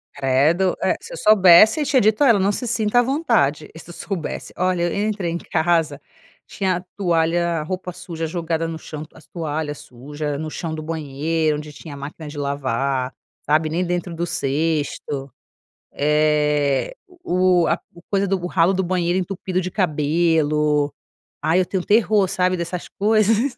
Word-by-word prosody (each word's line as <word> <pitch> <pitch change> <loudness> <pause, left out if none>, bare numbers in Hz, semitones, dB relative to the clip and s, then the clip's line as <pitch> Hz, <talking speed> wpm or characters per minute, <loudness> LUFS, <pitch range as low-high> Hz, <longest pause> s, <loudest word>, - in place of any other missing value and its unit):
Credo! 145 +7 +2
É, - - +2
se - - -11
eu - - -6
soubesse 215 - +6
eu - - 0
tinha 265 -2 +3
dito 215 +5 +3
a - - +5
ela: 230 -5 +5
"Não 195 +1 +2
se 245 +4 -3
sinta 225 0 +2
à - - +6
vontade". 230 - +1
E 160 - -11
se 175 - -12
soubesse 180 -4 -5
Olha, 185 -1 +1
eu 200 +5 0
entrei 200 -6 -2
em 170 - -2
casa, 160 -4 0 0.5
tinha 185 -3 -1
toalha, 170 -2 +1
roupa 185 +2 -4
suja 175 -3 -6
jogada 165 0 -2
no 165 -1 -5
chão, 155 -1 -7
as - - -17
toalhas 155 -3 -4
suja 145 +4 -6
no 155 +1 -4
chão 160 +1 -5
do 155 - -5
banheiro, 155 0 -1
onde 150 0 -8
tinha 150 0 -10
máquina 145 +3 -8
de 145 0 -9
lavar, 135 -2 -1 0.3
sabe, 155 +2 +2
nem 175 +4 -1
dentro 175 0 -3
do 170 - -2
cesto, 145 -3 -2 0.6
eh, 150 - +1 0.3
o 180 -1 +3
a - - +1
o 170 - -15
coisa 200 0 +1
o 180 -2 -1
ralo 175 +1 +2
do 190 0 0
banheiro 180 0 0
entupido 185 0 -3
de 185 - -3
cabelo. 150 -3 +1 0.5
Ai, 160 +4 +2
eu 185 - 0
tenho 185 -1 -2
terror, 210 -1 +3
sabe, 185 0 +1
dessas 170 +1 -4
coisas. 220 +4 +2
170 Hz, 170 wpm, -21 LUFS, 150-185 Hz, 0.6 s, soubesse